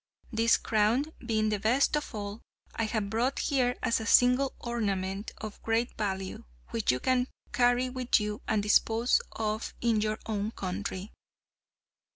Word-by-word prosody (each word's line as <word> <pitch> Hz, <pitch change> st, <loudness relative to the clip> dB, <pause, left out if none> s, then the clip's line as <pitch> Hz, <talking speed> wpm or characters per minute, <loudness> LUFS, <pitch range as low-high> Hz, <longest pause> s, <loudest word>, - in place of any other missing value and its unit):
This 230 Hz, 0 st, +4 dB
crown, 220 Hz, +5 st, +2 dB, 0.2 s
being 220 Hz, -2 st, +1 dB
the 210 Hz, -1 st, 0 dB
best 245 Hz, +8 st, +3 dB
of 295 Hz, -5 st, -3 dB
all, 205 Hz, +1 st, -5 dB, 0.3 s
I 225 Hz, -, 0 dB
have 215 Hz, -2 st, -2 dB
brought 245 Hz, +5 st, 0 dB
here 250 Hz, -3 st, +1 dB
as 230 Hz, -, +2 dB
a 220 Hz, -, -5 dB
single 250 Hz, +3 st, +4 dB
ornament 200 Hz, -4 st, -2 dB
of 215 Hz, -1 st, -8 dB
great 225 Hz, +2 st, 0 dB
value, 190 Hz, -3 st, -3 dB, 0.3 s
which 115 Hz, -, +1 dB
you 125 Hz, -, -1 dB
can 255 Hz, -, +1 dB, 0.3 s
carry 245 Hz, +1 st, +3 dB
with 255 Hz, -1 st, +1 dB
you 210 Hz, 0 st, -3 dB
and 215 Hz, -3 st, +1 dB
dispose 225 Hz, +3 st, +3 dB
of 215 Hz, 0 st, -3 dB
in 230 Hz, -3 st, +2 dB
your 215 Hz, 0 st, 0 dB
own 215 Hz, 0 st, -2 dB
country." 190 Hz, +1 st, -4 dB
220 Hz, 155 wpm, -29 LUFS, 210-245 Hz, 0.3 s, This